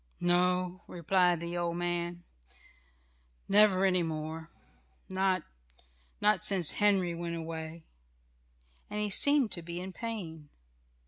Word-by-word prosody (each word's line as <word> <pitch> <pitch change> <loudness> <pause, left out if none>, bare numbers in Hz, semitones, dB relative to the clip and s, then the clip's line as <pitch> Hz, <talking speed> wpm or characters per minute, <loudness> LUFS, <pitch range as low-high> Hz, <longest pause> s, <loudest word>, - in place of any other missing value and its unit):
"No," 180 +1 +1
replied 175 0 +1
the 170 +1 -4
old 170 -1 -1
man. 175 0 -3 1.2
"Never 195 -2 +5
any 185 -2 +3
more. 160 0 -4 0.6
Not 190 -2 0 0.8
not 210 +1 +3
since 195 -6 +2
Henry 195 -4 +2
went 170 0 -4
away," 160 0 -6 1.0
and 210 - -4
he 210 -1 -1
seemed 285 0 +5
to 170 - -1
be 170 +1 -6
in 185 +1 -7
pain. 170 -11 -6
175 Hz, 115 wpm, -31 LUFS, 170-195 Hz, 1.2 s, Never